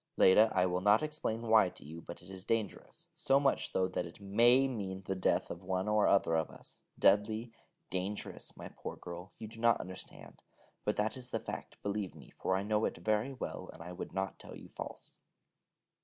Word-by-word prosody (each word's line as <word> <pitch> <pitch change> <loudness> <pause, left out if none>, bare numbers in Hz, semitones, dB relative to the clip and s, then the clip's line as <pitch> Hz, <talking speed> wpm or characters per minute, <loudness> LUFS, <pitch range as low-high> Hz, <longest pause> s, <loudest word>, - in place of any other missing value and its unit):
Leda, 105 +4 +7
I 90 -1 +4
will 90 0 0
not 105 +6 +5
explain 150 -7 -2
why 110 -4 +5
to - - -14
you, 80 +3 -8
but 85 - -9
it 90 - -13
is 95 -1 -8
dangerous, 110 -1 -3
so 135 +1 +3
much 140 -1 +1
so 95 0 +2
that 90 -1 -2
it 85 - -13
may 120 +7 +5
mean 95 -6 -4
the 95 - -1
death 95 - +1
of 85 - -7
one 95 +1 -1
or 105 0 +4
other 95 -4 +4
of 80 -1 +1
us: - - -13 0.2
deadly, 105 +3 +4
deadly 115 - -20 0.4
dangerous, 95 +3 -4
my - - -7
poor - - -6
girl. 90 +2 -8
You 110 - -7
do 115 +1 -12
not 115 -1 +4
understand, 95 0 -8 0.4
but 105 - +1
that 105 +1 0
is 125 -1 -5
the - - -1
fact, - - -7
believe 100 -2 -2
me, - - -13
for 95 - +1
I 95 - 0
know 105 +1 +2
it - - -2
very 110 +4 +1
well, 130 - -5
and - - -11
I 90 - -7
would 90 - -6
not 95 0 -3
tell - - -9
you - - -12
false. - - -8
100 Hz, 215 wpm, -33 LUFS, 95-110 Hz, 0.4 s, Leda